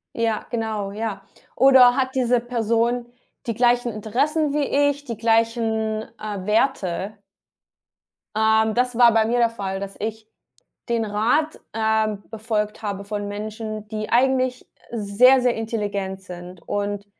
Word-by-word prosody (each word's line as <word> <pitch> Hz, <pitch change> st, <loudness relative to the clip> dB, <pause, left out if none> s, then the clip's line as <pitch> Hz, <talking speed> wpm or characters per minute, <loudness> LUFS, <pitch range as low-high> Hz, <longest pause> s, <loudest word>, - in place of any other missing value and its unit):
Ja, 225 Hz, -2 st, 0 dB
genau, 220 Hz, -4 st, -3 dB
ja, 210 Hz, -2 st, -4 dB, 0.3 s
oder 260 Hz, -2 st, +7 dB
hat 260 Hz, -1 st, 0 dB
diese 250 Hz, -2 st, +2 dB
Person 235 Hz, 0 st, 0 dB, 0.4 s
die 230 Hz, -, -1 dB
gleichen 240 Hz, +1 st, +2 dB
Interessen 275 Hz, +8 st, 0 dB
wie 285 Hz, 0 st, +2 dB
ich, 285 Hz, 0 st, -6 dB
die 235 Hz, -5 st, -5 dB
gleichen, 225 Hz, -1 st, +1 dB, 0.2 s
äh, 205 Hz, -3 st, -5 dB
Werte? 210 Hz, -3 st, 0 dB, 1.2 s
Ähm, 220 Hz, 0 st, +3 dB
das 250 Hz, 0 st, 0 dB
war 240 Hz, -1 st, +7 dB
bei 220 Hz, -1 st, +3 dB
mir 240 Hz, +2 st, +1 dB
der 235 Hz, -1 st, +3 dB
Fall, 195 Hz, -4 st, -4 dB
dass 195 Hz, 0 st, -7 dB
ich 220 Hz, 0 st, -5 dB, 0.6 s
den 235 Hz, -1 st, 0 dB
Rat, 230 Hz, +10 st, 0 dB
ähm, 220 Hz, -2 st, 0 dB
befolgt 215 Hz, -1 st, -3 dB
habe 200 Hz, -2 st, -4 dB
von 205 Hz, 0 st, -4 dB
Menschen, 215 Hz, +1 st, -6 dB
die 215 Hz, 0 st, -5 dB
eigentlich 255 Hz, 0 st, +2 dB, 0.3 s
sehr 235 Hz, +4 st, +4 dB
sehr 245 Hz, -1 st, +2 dB
intelligent 205 Hz, -4 st, -3 dB
sind 180 Hz, -1 st, -10 dB
und 205 Hz, 0 st, -2 dB
220 Hz, 135 wpm, -22 LUFS, 210-240 Hz, 1.2 s, oder